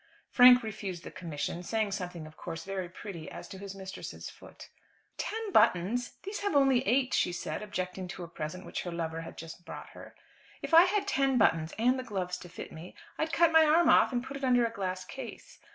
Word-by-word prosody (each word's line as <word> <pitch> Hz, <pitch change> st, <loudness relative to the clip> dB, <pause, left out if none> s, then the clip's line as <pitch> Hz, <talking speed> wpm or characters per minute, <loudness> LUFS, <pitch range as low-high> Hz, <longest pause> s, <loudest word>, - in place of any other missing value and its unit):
Frank 250 Hz, 0 st, +8 dB
refused 195 Hz, -5 st, -5 dB
the -, -, -8 dB
commission, 170 Hz, 0 st, -4 dB
saying 215 Hz, +3 st, -1 dB
something 180 Hz, -4 st, -5 dB
of 155 Hz, 0 st, -13 dB
course 165 Hz, -1 st, -6 dB
very 190 Hz, -2 st, -4 dB
pretty 175 Hz, -3 st, -8 dB
as -, -, -9 dB
to 190 Hz, -, -9 dB
his 200 Hz, 0 st, -7 dB
mistress's 190 Hz, -1 st, -7 dB
foot. -, -, -14 dB, 0.5 s
"Ten 440 Hz, -1 st, -3 dB
buttons! 220 Hz, -, +2 dB
These 400 Hz, +2 st, -5 dB
only 275 Hz, -9 st, +4 dB
have 255 Hz, -, -5 dB
eight," 255 Hz, +1 st, +2 dB
she 180 Hz, -, +2 dB
said, 175 Hz, -, -4 dB
objecting 185 Hz, -3 st, -4 dB
to 180 Hz, 0 st, -7 dB
a -, -, -7 dB
present 160 Hz, +3 st, -6 dB
which -, -, -4 dB
her 175 Hz, -, -5 dB
lover 165 Hz, -1 st, -3 dB
had 165 Hz, -, -10 dB
just 165 Hz, +2 st, -9 dB
brought -, -, -9 dB
her. -, -, -13 dB, 0.5 s
"If -, -, -5 dB
I 335 Hz, +2 st, +10 dB
had 400 Hz, +1 st, 0 dB
ten 275 Hz, -8 st, +2 dB
buttons, 165 Hz, -7 st, +2 dB
and 250 Hz, +4 st, +3 dB
the -, -, -4 dB
gloves 180 Hz, -5 st, -3 dB
to 175 Hz, -, -11 dB
fit 175 Hz, -, -8 dB
me, 165 Hz, +3 st, -10 dB, 0.2 s
I'd 315 Hz, +1 st, 0 dB
cut 335 Hz, -1 st, +4 dB
my 320 Hz, 0 st, +7 dB
arm 315 Hz, +2 st, +5 dB
off -, -, +6 dB
and 245 Hz, -1 st, -1 dB
put 275 Hz, +2 st, -6 dB
it 275 Hz, -, -10 dB
under 245 Hz, -2 st, +4 dB
a 230 Hz, -, -2 dB
glass 185 Hz, -1 st, -3 dB
case. 240 Hz, +5 st, -9 dB
200 Hz, 215 wpm, -30 LUFS, 175-260 Hz, 0.5 s, I